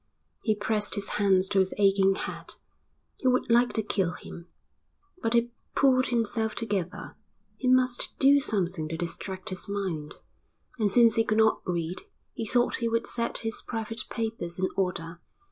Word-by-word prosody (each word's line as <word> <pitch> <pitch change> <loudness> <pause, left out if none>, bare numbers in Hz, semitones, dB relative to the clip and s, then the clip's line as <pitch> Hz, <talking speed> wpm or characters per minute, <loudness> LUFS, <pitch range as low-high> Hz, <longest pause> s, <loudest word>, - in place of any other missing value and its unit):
He 215 -2 +1
pressed 210 0 0
his 200 -1 -2
hands 190 -2 +2
to 195 - +2
his 190 0 +1
aching 195 -1 +4
head. - - -6 0.6
He 260 - -2
would 255 -2 +2
like 240 +1 +4
to 220 - 0
kill 190 -4 0
him. 170 0 -10 0.7
But 230 +1 +1
he 235 0 +2 0.2
pulled 260 -1 +4
himself 225 -2 0
together. 200 -6 -3 0.4
He 260 - -3
must 255 -1 +2
do 280 +1 +6
something 185 - 0
to 165 - -4
distract 185 +3 -5
his 185 +1 -3
mind, 185 -7 -3 0.6
and 210 -2 +2
since 230 +1 +5
he 225 - +5
could 215 -1 0
not 220 0 +3
read 175 0 -2 0.3
he 225 - -4
thought 245 +2 +2
he 230 -1 -1
would 230 0 0
set 235 -1 -2
his 225 - -2
private 225 -1 -3
papers 220 -7 -4
in 185 0 0
order. 175 -3 -2
210 Hz, 165 wpm, -27 LUFS, 185-235 Hz, 0.7 s, do